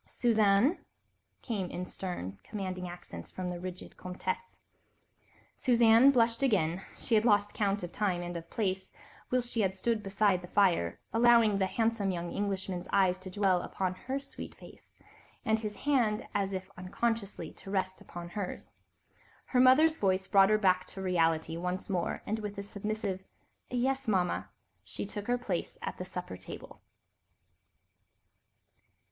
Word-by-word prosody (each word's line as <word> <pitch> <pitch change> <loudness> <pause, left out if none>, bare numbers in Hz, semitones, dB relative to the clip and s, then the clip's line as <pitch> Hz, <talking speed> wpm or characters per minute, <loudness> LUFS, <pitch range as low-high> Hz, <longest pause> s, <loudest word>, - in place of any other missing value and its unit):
"Suzanne," 220 - +3 0.6
came 200 -7 -2
in 180 - -4
stern, 100 - -5
commanding 185 -3 -4
accents 175 0 -9
from 180 -1 -4
the 175 - -5
rigid 185 0 -8
Comtesse. 185 - -4 1.0
Suzanne 235 0 +6
blushed 230 -3 +3
again; 190 -9 +2
she 235 - -3
had 215 -1 +5
lost 205 -3 +3
count 200 -2 0
of 175 - -5
time 185 -4 0
and 175 0 -5
of 170 0 -6
place 190 -3 -2 0.4
whilst 250 -1 0
she 230 - +1
had 190 -1 0
stood 225 +2 0
beside 195 -2 +2
the 180 - -9
fire, 175 - +2
allowing 230 -3 +5
the 190 - +2
handsome 225 -1 0
young 175 -2 -3
Englishman's 190 -3 -2
eyes 185 -2 +3
to 185 0 -8
dwell 185 -2 +2
upon 185 0 -2
her 260 +9 -4
sweet 275 - -9
face, - - -15 0.5
and 220 0 +3
his 210 -1 -4
hand, 240 -7 +1
as 200 -1 0
if 190 -1 -5
unconsciously, 205 +3 -2
to - - -12
rest 190 -1 -1
upon 175 0 -8
hers. 195 +1 -5 0.7
Her 250 - +1
mother's 305 +6 +6
voice 190 -1 +1
brought 195 0 +5
her 215 - +5
back 185 -3 +2
to 190 - -8
reality 165 -3 +1
once 180 +3 -3
more, 175 -3 -1
and 215 +2 -1
with 210 -1 -5
a 200 - -3
submissive 200 -2 -3 0.5
"Yes, 265 +1 0
Mama," 185 -4 +1 0.3
she - - -5
too 200 - -10
took 205 - -13
her 245 0 +2
place 195 -8 -3
at - - -4
the 180 - -4
supper 180 - -6
table. - - -10
195 Hz, 155 wpm, -31 LUFS, 185-225 Hz, 1.0 s, Suzanne